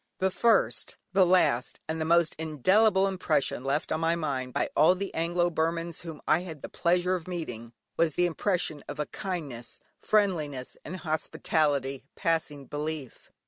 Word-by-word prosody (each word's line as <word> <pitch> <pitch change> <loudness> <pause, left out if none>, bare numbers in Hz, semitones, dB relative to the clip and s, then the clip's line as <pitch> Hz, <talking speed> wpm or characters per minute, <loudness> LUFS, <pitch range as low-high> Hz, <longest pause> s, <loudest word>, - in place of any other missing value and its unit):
The 190 0 +1
first, 230 +2 +2 0.2
the 190 -1 +5
last, 170 -9 +2
and 160 0 -2
the - - 0
most 170 0 +3
indelible 190 - +3
impression 180 -9 0
left 140 +3 -1
on 160 - +1
my 165 +1 +2
mind 135 -6 -2
by - - 0
all 160 +5 +6
the 195 +1 -4
Anglo 175 +1 +1
Burmans 165 0 -1
whom 160 -3 -9
I 155 - +4
had 165 -5 -8
the - - -5
pleasure 180 +1 +1
of 180 -2 -3
meeting, 120 -11 -5 0.3
was 165 -3 +2
the 180 - +3
impression 170 -4 -1
of - - -7
a 150 - 0
kindness, 145 - -5 0.2
friendliness, 155 -11 0
and 175 - -6
hospitality 155 -4 0
passing 155 -4 -1
belief. 150 -2 -5
160 Hz, 160 wpm, -28 LUFS, 150-180 Hz, 0.3 s, all